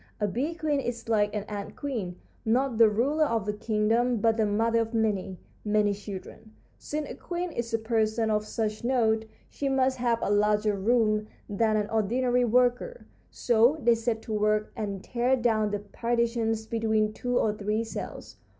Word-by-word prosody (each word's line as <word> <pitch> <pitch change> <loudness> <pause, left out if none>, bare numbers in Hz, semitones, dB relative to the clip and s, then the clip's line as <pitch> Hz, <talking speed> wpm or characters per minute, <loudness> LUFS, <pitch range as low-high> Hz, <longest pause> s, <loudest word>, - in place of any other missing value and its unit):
A 210 - +1
bee 270 - -2
queen 305 -4 0
is 240 -3 -4
like 210 -2 +2
an 210 - -2
ant 205 -1 -6
queen, 225 -11 -4 0.3
not 245 +1 +1
the 225 -1 +8
ruler 280 +9 +1
of 225 -7 -1
a 210 - 0
kingdom, 225 +3 +1
but 225 +1 +2
the 220 -1 +1
mother 225 +3 +2
of 230 0 -2
many, 200 -4 0 0.3
many 210 -1 +2
children. 205 +2 -9 0.3
Since 300 0 -4
a - - -6
queen 350 0 -4
is 235 -4 -4
a 225 - +2
person 220 0 0
of 210 0 +1
such 215 0 -3
note, 225 -3 +2 0.2
she 280 - -3
must 265 -1 +1
have 240 -1 +2
a - - 0
larger 210 0 +2
room 215 +1 +1 0.2
than 215 +1 +1
an 210 -1 0
ordinary 245 +3 +1
worker, 250 - +1 0.2
so 240 +5 +3
they 235 +1 +5
set 225 -1 -2
to 220 - -5
work 215 0 +1
and 200 -4 -4
tear 250 +2 +1
down 225 -4 +1
the 205 - -1
partitions 230 +1 -1
between 220 -1 0
two 245 +2 -1
or 215 - +2
three 210 +2 -1
cells. 225 - -7
225 Hz, 175 wpm, -27 LUFS, 210-240 Hz, 0.3 s, the